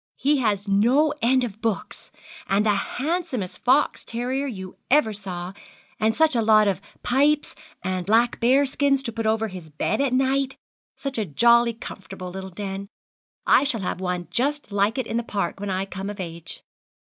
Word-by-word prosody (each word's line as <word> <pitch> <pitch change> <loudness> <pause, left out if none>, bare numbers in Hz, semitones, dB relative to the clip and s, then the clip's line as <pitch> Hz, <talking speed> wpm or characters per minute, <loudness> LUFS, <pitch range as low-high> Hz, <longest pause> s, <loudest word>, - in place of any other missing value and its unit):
He 290 +2 +2
has 210 -4 0
no 245 +10 +3
end 255 +2 +3
of 220 -2 -5
books, 225 -3 -3 0.4
and 200 +2 +2
the 215 - +4
handsomest 260 - -2
fox 260 +4 +2
terrier 255 +4 -2
you 190 -7 -7
ever 265 -6 +4
saw 185 -3 -6 0.5
and 220 +1 +2
such 320 -4 +4
a 230 - +3
lot 215 -1 +5
of 195 -1 0 0.2
pipes, 290 +4 +2 0.3
and 185 0 -1
black 230 +3 +3
bear 260 +4 +4
skins 275 0 +1
to 235 - -3
put 225 0 -2
over 220 0 +1
his 180 -4 -9
bed 155 - -1
at 280 -2 +1
night 265 +1 +1 0.4
such 275 -4 -4
a 215 - 0
jolly 235 +8 +4
comfortable 190 -4 -8
little 190 +1 -6
den! 195 +1 -5 0.6
I - - +5
shall 255 -7 -1
have 180 0 -3
one 180 -2 -2
just 285 +5 -1
like 205 +3 +1
it 260 - -1
in 230 - -2
the 235 - 0
park 205 -3 -3
when 205 0 -4
I 190 0 -1
come 195 +1 -6
of 205 0 -7
age.' 170 -2 -6
220 Hz, 180 wpm, -24 LUFS, 195-260 Hz, 0.6 s, lot